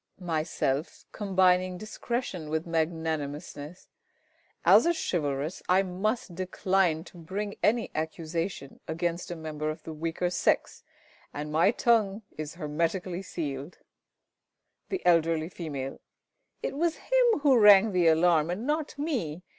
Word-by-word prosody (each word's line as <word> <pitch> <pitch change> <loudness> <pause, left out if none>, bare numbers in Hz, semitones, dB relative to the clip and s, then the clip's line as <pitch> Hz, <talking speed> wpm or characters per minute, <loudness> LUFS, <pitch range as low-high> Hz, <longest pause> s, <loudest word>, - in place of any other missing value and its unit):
Myself 160 -4 -2
(combining 185 -2 +2
discretion 215 -5 -4
with 160 +1 -1
magnanimousness). 160 -1 -3 0.8
As - - +7
a 340 - +3
chivalrous, 150 - -2
I 185 +2 +5
must 195 +2 -2
decline 185 -2 +1
to 175 - -14
bring 200 +5 -4
any 230 +2 +2
accusation 160 -1 -4
against 170 +2 -2
a 175 - -4
member 155 -1 -4
of 155 +1 -6
the 160 - -7
weaker 165 +3 -2
sex, 175 - 0 0.5
and 150 +1 -4
my 165 +5 +4
tongue 220 -3 +2
is 155 +1 -6
hermetically 170 +3 -2
sealed. 150 -4 -5 1.1
The 380 - -3
Eld. 165 -2 +5
F. 155 -4 -4 0.6
It - - -2
was 330 +2 +1
him - - +2
who 275 -4 +5
rang 210 0 +8
the 180 -3 +3
alarm, 160 -1 +4
and 190 +7 -3
not 300 0 -2
me. 225 - -2
175 Hz, 125 wpm, -28 LUFS, 155-195 Hz, 1.1 s, rang